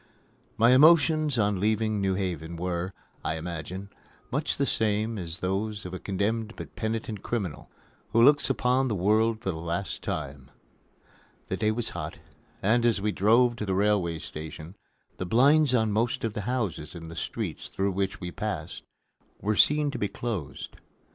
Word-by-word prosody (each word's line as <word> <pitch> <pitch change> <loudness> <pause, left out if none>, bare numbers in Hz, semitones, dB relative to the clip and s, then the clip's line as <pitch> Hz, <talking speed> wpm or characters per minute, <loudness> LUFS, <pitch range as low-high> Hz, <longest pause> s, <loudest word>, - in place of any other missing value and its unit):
My 115 +2 +6
emotions 155 0 +5
on 105 -3 +2
leaving 110 0 +1
New 95 -1 +1
Haven 85 -4 -3
were, 90 +1 -2 0.3
I 80 - -1
imagine, 90 +4 -6 0.4
much - - -1
the - - +2
same 110 0 0
as 85 -1 -6
those 100 +2 -2
of 90 - -6
a 95 - -4
condemned 105 +3 -1
but - - -9
penitent 110 -2 -3
criminal 100 -11 -3 0.4
who 115 - +5
looks 145 +2 +5
upon 130 +1 +2
the 110 - -1
world 110 +4 +2
for 95 - -1
the 80 - -6
last 85 +3 -3
time. 70 -3 -5 1.0
The 95 - -1
day 105 - +1
was 110 +1 -1
hot, 80 -3 -5 0.5
and, 115 +4 +3
as 120 -3 +3
we 105 +2 0
drove 120 +5 +4
to 105 - -3
the 95 - +1
railway 95 -4 +2
station, 80 +3 -8 0.4
the 95 - -3
blinds 140 - +5
on 110 -3 +2
most 115 +3 0
of 115 -2 -1
the 105 +2 -4
houses 95 - -2
in 80 -1 -8
the 80 - -9
streets 75 - -4
through 100 +1 -1
which 95 0 -2
we 90 -2 -5
passed 90 -6 -4 0.6
were 105 +1 0
seen 150 +5 +4
to - - -5
be 105 - +1
closed. 100 - -5
105 Hz, 170 wpm, -27 LUFS, 90-115 Hz, 1.0 s, My